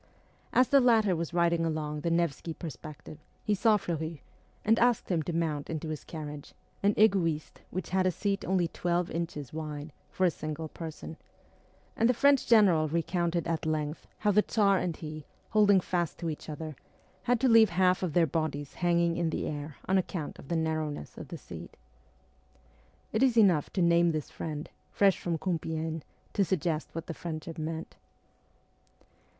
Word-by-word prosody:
As 255 0 +4
the 280 - +6
latter 225 -7 +4
was 165 -1 -3
riding 170 -1 +2
along 155 -2 -2
the 170 - 0
Nevsky 165 -1 0
Perspective 155 0 -9 0.2
he 210 - +1
saw 210 +2 +4
Fleury, 160 -5 -4 0.4
and 225 +2 +4
asked 240 -2 +2
him 175 -4 +1
to 165 - -3
mount 160 -3 -1
into 160 0 -3
his 155 -2 -5
carriage, 150 -3 -8 0.3
an 200 +1 +3
ego'iste 175 -8 +2
which 185 -2 -5
had 185 0 +2
a - - +3
seat 195 +3 -1
only 185 -2 +1
twelve 175 +1 -1
inches 160 -5 -4
wide, 150 -1 -5 0.2
for 185 - +1
a 175 - +4
single 155 +1 -5
person; 160 0 -8 0.8
and 230 - +3
the 250 - +3
French 280 +1 +4
general 190 -9 +5
recounted 170 +1 0
at 165 -1 -1
length 155 0 -2
how 210 - +2
the 210 +1 +5
Tsar 200 -3 +3
and 175 -3 -2
he, 155 -1 -7 0.3
holding 205 -3 +5
fast 175 -2 -2
to 165 -2 -2
each 155 - -8
other, 155 0 -6 0.5
had 245 -1 +4
to 260 - +3
leave 225 -3 +7
half 180 +1 +3
of 180 -5 -2
their 170 0 +5
bodies 145 -2 -2
hanging 170 -1 +1
in 170 -1 +1
the - - -2
air 145 0 -5
on 190 0 +3
account 175 -4 -4
of - - -12
the 170 - -1
narrowness 155 - -2
of - - -8
the - - -7
seat. - - -10 1.4
It 220 - +1
is 255 -3 +4
enough 185 -9 +5
to 185 - +2
name 170 0 +4
this 155 -2 -4
friend, 155 -1 -5 0.2
fresh 200 -2 +3
from 170 -2 -1
Compiegne, 160 -1 -2 0.3
to 200 - +3
suggest 165 -3 -1
what 165 - -5
the - - -5
friendship 160 -1 -6
meant. 160 +1 -5
170 Hz, 175 wpm, -30 LUFS, 155-190 Hz, 1.4 s, leave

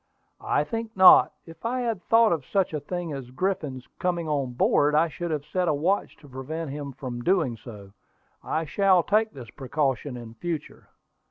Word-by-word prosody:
"I - - +1
think 225 -3 -5
not. 185 -1 +8
If 165 -1 -14
I 250 +2 -1
had 230 -6 -2
thought 225 +3 +4
of 160 -5 0
such 190 +3 0
a 150 - -1
thing 170 +2 -5
as 135 -3 -7
Griffin's 135 -4 -3
coming 175 -2 -1
on 140 -4 -1
board, 145 +4 +3
I 160 +2 +4
should 175 +2 -5
have 150 -2 -3
set 180 +4 -1
a 155 - +2
watch 180 +8 -1
to 145 - -15
prevent 140 +4 -5
him 140 -1 -6
from 125 -2 -6
doing 160 -6 +1
so. 105 -4 -12 0.5
I 160 +1 -2
shall 185 +2 +3
take 215 +3 +2
this 120 -5 -10
precaution 135 -2 -2
in 115 -2 -10
future." 155 +5 -6
155 Hz, 185 wpm, -26 LUFS, 135-185 Hz, 0.5 s, not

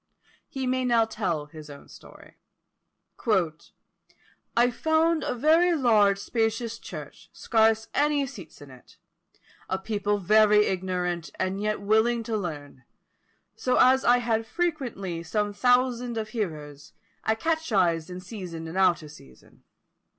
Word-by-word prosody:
He 265 -1 -4
may 255 0 0
now 235 -2 +3
tell 185 -9 -3
his 150 0 -12
own 140 -1 -12
story. - - -16 2.2
"I 245 +1 +4
found 315 +5 +1
a - - -2
very 325 +7 +3
large 215 -8 +3
spacious 225 +2 -2
church, - - -10
scarce 220 -1 +2
any 290 -1 +2
seats 190 - -11
in 140 - -14
it; 125 -1 -18 0.7
a 190 - 0
people 205 +1 -1
very 210 +2 +4
ignorant, 180 -2 -2
and 190 +1 -2
yet 210 -1 -1
willing 220 +3 +2
to 225 0 -3
learn; 145 -9 -6 0.7
so 255 - 0
as 260 +1 +5
I 245 +1 +5
had 225 -2 -1
frequently 245 - -3
some 205 +5 -2
thousands 245 0 +1
of 215 -1 -3
hearers, 150 - -6 0.3
I 220 - +1
catechised 205 - 0
in 180 0 -7
season 180 -5 -7
and 160 - -8
out 175 -3 +3
of 150 - -11
season. 65 - -18
215 Hz, 135 wpm, -26 LUFS, 180-245 Hz, 2.2 s, as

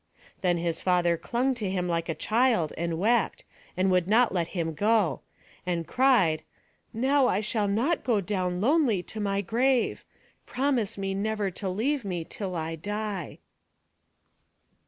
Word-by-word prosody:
Then 175 -2 +2
his 170 -1 -2
father 175 -2 +2
clung 245 +10 -1
to 215 -6 -3
him 180 -1 -1
like 170 -1 -1
a 165 - -1
child, 225 - +1
and 170 0 -2
wept, 225 +4 +1 0.3
and 185 +1 +2
would 180 -1 +2
not 230 +2 +4
let 170 -3 0
him 165 -1 -1
go; 210 +1 +1 0.4
and 170 -2 -2
cried, 240 -12 +3 0.5
"Now 260 +4 +2
I 195 - +1
shall 215 -1 0
not 240 +12 0
go 230 -5 +2
down 185 -2 -2
lonely 250 - +2
to 220 - -8
my 200 -1 0
grave. 245 +5 +1 0.4
Promise 255 -6 0
me 195 -1 -2
never 205 0 -1
to 190 +2 -4
leave 250 +8 -1
me 180 -4 -3
till 185 +2 -5
I 165 0 -3
die." 205 0 -4
200 Hz, 155 wpm, -27 LUFS, 175-235 Hz, 0.5 s, not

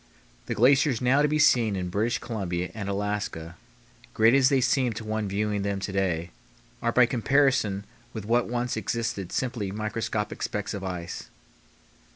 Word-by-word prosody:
The 120 - -2
glaciers 130 +2 +4
now 130 +3 +3
to 150 - +4
be 150 +1 +1
seen 120 -8 +4
in 90 -1 -3
British 110 +6 0
Columbia 90 -6 -3
and 100 -2 -5
Alaska, 100 -5 -3 0.6
great 110 +2 +5
as 135 -1 +5
they 135 -2 +3
seem 130 -1 +2
to 110 - -6
one 110 -1 -2
viewing 105 +1 -1
them 100 0 -2
to 95 - -4
day, 90 -3 -1 0.5
are 115 - +1
by 125 +1 +5
comparison 125 -5 +2 0.3
with 110 -3 -6
what 120 +2 +2
once 120 0 -1
existed 110 -3 -3
simply 120 -6 -2
microscopic 110 0 -3
specks 105 +1 -3
of 100 -2 -5
ice. 90 -2 -5
110 Hz, 165 wpm, -26 LUFS, 100-120 Hz, 0.6 s, great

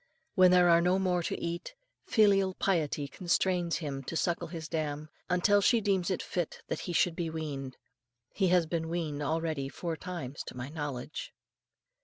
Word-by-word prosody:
When 185 -1 +6
there 180 -1 +6
are 170 0 +6
no 180 +2 +3
more 180 -2 +1
to - - -3
eat, 170 - -4 0.3
filial 195 -4 +4
piety 155 -6 0
constrains 175 +2 0
him 140 -4 -4
to 165 - -3
suckle 170 0 0
his 165 -1 -6
dam, 155 -1 -3 0.2
until 200 +3 +4
she 235 +3 +4
deems 195 -4 +1
it 185 - -1
fit 175 -3 -3
that - - -2
he - - 0
should 170 0 +2
be 170 -1 -2
weaned. 145 -5 -5 0.6
He 195 - +2
has 175 -1 +4
been 160 0 -2
weaned 160 -4 -2
already 155 -2 -1
four 165 +3 -4
times, 160 -6 -6
to - - -8
my 125 +2 -5
knowledge. 145 -3 -5
170 Hz, 175 wpm, -30 LUFS, 155-180 Hz, 0.6 s, When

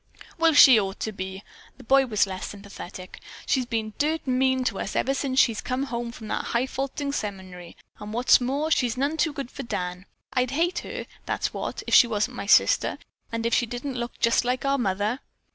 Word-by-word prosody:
"Well, 330 -1 +4
she 265 -4 +9
sure 205 - +2
ought 195 0 -7
to 220 - -2
be." 190 0 -7 0.3
The - - -13
boy 270 +2 +4
was 210 -4 +2
less 190 -1 -5
sympathetic. 195 -2 -10 0.2
"She's 255 -3 0
been 220 -2 -2
dirt 315 +2 0
mean 260 0 +2
to 230 -6 -2
us 195 - -4
ever 270 - +1
since 270 -1 0
she's 230 -6 +3
been 255 +2 -2
home 235 -3 -4
from 225 -2 -10
that - - -2
hifalutin' 270 +3 -2
seminary, 190 -6 -6 0.2
and 210 0 -7
what's 245 +3 +4
more, 280 +6 -1
she's 245 -6 +1
none 280 +4 0
too 320 0 +1
good 275 -4 -6
to - - -7
Dan. 180 -4 -4 0.3
I'd 250 -1 +1
hate 335 +7 0
her, - - -6 0.2
that's - - -2
what, - - -4
if - - -4
she 240 - +8
wasn't 230 +3 -1
my 200 - -6
sister, - - +4 0.3
and 230 0 -3
if 230 - 0
she 240 - +2
didn't 245 +4 -5
look 240 -1 -5
just 230 +1 +3
like 250 +2 -1
our 275 0 +1
mother. 205 +3 -1
245 Hz, 210 wpm, -25 LUFS, 210-270 Hz, 0.3 s, she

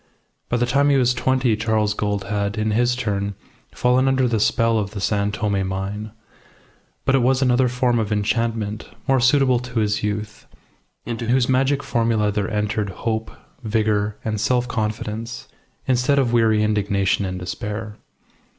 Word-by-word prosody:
By 120 - +1
the 120 - +2
time 140 +4 +2
he 140 - +4
was 125 -1 +3
twenty 125 -1 +1
Charles 110 -1 0
Gould 105 -1 -2
had, 100 +1 -2
in 110 0 0
his 120 +3 +2
turn, 100 -4 -2 0.4
fallen 125 +2 +2
under 130 -1 +2
the 115 -2 0
spell 115 +2 +2
of 100 0 -4
the - - -3
San 100 +1 0
Tome 100 -2 -1
mine. 100 +3 -4 0.9
But 135 - +2
it 135 - +4
was 130 +2 +2
another 125 0 +3
form 125 -1 +1
of 110 -1 -2
enchantment, 110 0 -1 0.2
more 135 -1 +3
suitable 130 0 +4
to 125 -1 -3
his 105 -1 0
youth, 105 0 -4 0.6
into 115 0 -4
whose 125 +1 +2
magic 135 +2 +1
formula 115 -3 +1
there 105 0 -1
entered 105 -1 -1
hope, 110 +3 -3 0.3
vigour, 105 -1 0
and 110 -2 -2
self 125 0 +1
confidence, 110 +1 -4 0.4
instead 130 +2 +2
of 125 -4 +2
weary 110 -2 +3
indignation 100 -2 +1
and 95 -1 -3
despair. 105 +4 -5
110 Hz, 160 wpm, -22 LUFS, 105-125 Hz, 0.9 s, he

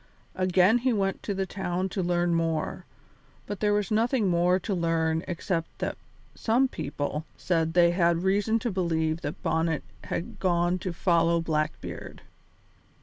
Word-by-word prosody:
Again 185 +4 +3
he 255 +1 +1
went 195 -2 0
to 200 - -3
the 190 0 -1
town 185 -1 -2
to 190 - -2
learn 175 -1 +1
more, 165 -2 -1 0.6
but 205 -2 -5
there 210 -1 +2
was 205 -1 0
nothing 225 0 +2
more 175 +1 +3
to 195 +2 -3
learn 165 -2 +1
except 170 -1 -3
that - - -2 0.4
some 240 +4 +2
people 145 - -4
said 165 -2 0
they 170 -1 +6
had 170 -1 +2
reason 205 +4 +2
to 240 - -1
believe 165 -3 0
that 145 -3 -5
Bonnet 160 -1 0 0.2
had 170 - -4
gone 175 0 +1
to 185 - -3
follow 170 -1 +2
Blackbeard. 155 -2 -3
175 Hz, 150 wpm, -27 LUFS, 165-195 Hz, 0.6 s, they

